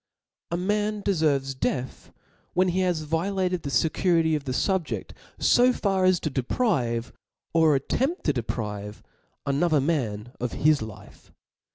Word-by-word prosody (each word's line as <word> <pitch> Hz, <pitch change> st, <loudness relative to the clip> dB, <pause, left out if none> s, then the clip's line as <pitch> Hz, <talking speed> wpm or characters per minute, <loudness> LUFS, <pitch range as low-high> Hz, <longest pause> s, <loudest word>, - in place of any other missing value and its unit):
A 170 Hz, -, -1 dB
man 210 Hz, +2 st, -1 dB
deferves 145 Hz, -7 st, +1 dB
death 125 Hz, 0 st, -3 dB, 0.5 s
wheii 185 Hz, 0 st, +4 dB
he 185 Hz, -, 0 dB
has 180 Hz, -4 st, +1 dB
violated 180 Hz, +3 st, -1 dB
the/ecurity 160 Hz, +4 st, +2 dB
of 145 Hz, -2 st, -4 dB
the 130 Hz, -, -2 dB
fubjedt 185 Hz, +5 st, -1 dB, 0.3 s
fo 250 Hz, +1 st, +5 dB
far 195 Hz, -5 st, +1 dB
as 185 Hz, -2 st, +4 dB
to 155 Hz, -, -2 dB
deprive, 125 Hz, -, 0 dB, 0.4 s
or 160 Hz, -3 st, +5 dB
attempt 265 Hz, -, -1 dB
to 150 Hz, -, +2 dB
deprive 105 Hz, -4 st, -4 dB, 0.4 s
another 150 Hz, +3 st, +2 dB
man 125 Hz, -7 st, -1 dB
of 125 Hz, -1 st, -3 dB
his 155 Hz, -1 st, +3 dB
life. 110 Hz, -3 st, -10 dB
155 Hz, 135 wpm, -26 LUFS, 130-185 Hz, 0.5 s, fo